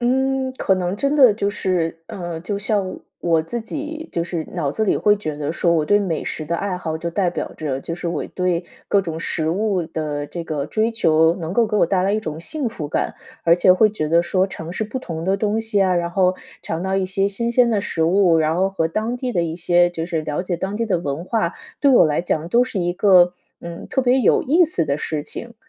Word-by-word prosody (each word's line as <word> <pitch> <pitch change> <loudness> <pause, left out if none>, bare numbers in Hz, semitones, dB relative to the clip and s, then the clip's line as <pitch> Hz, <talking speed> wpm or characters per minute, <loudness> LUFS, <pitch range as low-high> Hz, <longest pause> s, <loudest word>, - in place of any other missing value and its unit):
嗯， 265 +1 +1
可 190 - +2
能 185 +1 -2
真 280 +5 0
的 260 -7 +7
就 200 -1 -1
是 175 -5 -1
呃， 175 -3 -6
就 200 +3 -3
像 200 -1 0
我 - - -7 0.2
我 165 -2 +2
自 230 +9 -4
己 305 +7 -6
就 170 0 -1
是 170 -2 -4
脑 145 -5 -1
子 220 - 0
里 - - +2
会 210 0 +4
觉 155 -7 -5
得 150 +1 -3
说， 170 0 +1
我 155 -2 +2
对 205 - +4
美 180 -6 -2
食 155 - -4
的 170 +2 -2
爱 195 -1 -2
好 160 -3 -4
就 170 - -3
代 180 +1 0
表 - - -4
着 140 -4 -3
就 165 - -5
是 175 0 -4
我 170 -3 -3
对 180 -1 0 0.2
各 200 - +4
种 165 -3 -5
食 160 -2 -1
物 190 -1 0
的 150 -2 -4
这 170 +2 -6
个 150 -3 -3
追 220 +7 0
求， 160 -6 +3
能 165 -1 -5
够 235 +3 +3
给 210 - 0
我 - - +4
带 185 +1 +1
来 195 +2 +1
一 215 - +1
种 160 -6 -5
幸 265 - -2
福 155 -10 -6
感。 - - -1 0.3
而 170 0 +6
且 180 +1 +5
会 215 +4 +4
觉 155 -8 -3
得 170 +2 +4
说 185 +1 +2
尝 165 -2 -7
试 200 - -2
不 225 +5 -4
同 165 -9 -6
的 190 +3 +1
东 210 +2 0
西 220 -2 0
啊， 185 -1 +3
然 170 -1 0
后 185 0 +2 0.3
尝 160 +2 -3
到 190 0 0
一 190 -1 0
些 195 +1 0
新 235 +4 -1
鲜 240 -1 +4
的 210 - +1
食 165 -4 -2
物， 175 -1 +4
然 155 +2 +1
后 190 +1 +2
和 165 -4 -1
当 220 +7 -2
地 250 0 -3
的 175 -7 0
一 160 -1 -3
些 175 0 +3
就 165 -2 -4
是 165 -2 -2
了 150 +2 -2
解 180 -2 -2
当 190 +4 -3
地 230 - 0
的 190 -6 0
文 150 +1 -4
化， 190 -5 0 0.3
对 285 - +3
我 245 - +7
来 150 +1 +1
讲 165 -2 -2
都 240 +5 +4
是 205 -6 -3
一 175 0 0
个， 180 -2 +5 0.3
嗯， 170 0 -8
特 265 - 0
别 255 +1 +3
有 - - +3
意 330 +7 +4
思 180 - -1
的 140 0 -1
事 155 -2 -3
情。 235 +9 -7
180 Hz, 275 characters per minute, -21 LUFS, 165-210 Hz, 0.3 s, 的